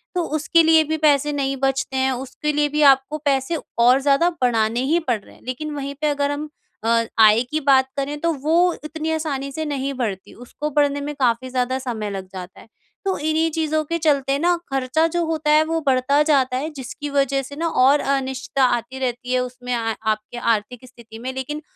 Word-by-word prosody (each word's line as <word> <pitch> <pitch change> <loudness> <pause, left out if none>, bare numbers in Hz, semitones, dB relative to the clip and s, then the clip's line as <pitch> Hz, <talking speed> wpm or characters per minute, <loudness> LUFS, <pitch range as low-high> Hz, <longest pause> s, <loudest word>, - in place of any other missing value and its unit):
तो 355 - +1
उसके 325 +2 +3
लिए 320 0 +5
भी 315 +1 -2
पैसे 295 -1 +3
नहीं 275 -1 -1
बचते 270 0 -1
हैं, 265 0 +2
उसके 265 +4 -3
लिए 295 0 +1
भी 300 +1 -1
आपको 270 +3 -6
पैसे 275 +3 +1 0.2
और 250 +3 +6
ज़्यादा 280 +5 +3
बढ़ाने 230 -2 +1
ही 325 +5 +2
पड़ 245 -9 -1
रहे - - -18
हैं। - - -21
लेकिन 300 +5 -4
वहीं 280 0 -4
पे 305 - +2
अगर 285 -1 0
हम 300 +1 -4 0.3
अ, 230 0 +2
आय 215 +1 +7
की 310 - 0
बात 265 -2 +4
करें 280 +2 -2
तो 335 0 +1
वो 315 +2 +2 0.3
इतनी 315 +1 -4
आसानी 285 -4 -3
से 315 +3 -4
नहीं 275 -1 -2
बढ़ती। 215 -7 -4
उसको 265 +5 -6
बढ़ने 285 -1 +2
में 295 +1 -4
काफ़ी 255 -1 0
ज़्यादा 255 0 -1
समय 230 -5 -4
लग 190 -1 -6
जाता 185 0 -9
है। - - -17 0.4
तो 380 - 0
इन्हीं 315 +2 +1
चीज़ों 310 0 0
के 335 +3 -2
चलते 280 -4 +1
न 350 0 +4 0.2
ख़र्चा 270 +4 +1
जो 345 - +1
होता 315 -2 0
है 305 +1 +5
वो 325 0 -1
बढ़ता 270 +3 +3
जाता 270 -4 +2
है 295 +4 -3
जिसकी 285 +3 -6
वज़ह 275 -1 +1
से 275 +2 -10
ना 335 +2 -1 0.2
और 280 +3 +5 0.2
अनिश्चितता 265 0 -2
आती 250 +3 -8
रहती 250 0 -3
है 255 - +3
उसमें 250 0 -4
अ, 225 -1 -1
आपके 215 +2 -2
आर्थिक 230 +2 -1
स्थिति 235 -3 -13
में। 255 +2 -5
लेकिन 265 +4 -5
275 Hz, 210 wpm, -21 LUFS, 250-300 Hz, 0.4 s, आय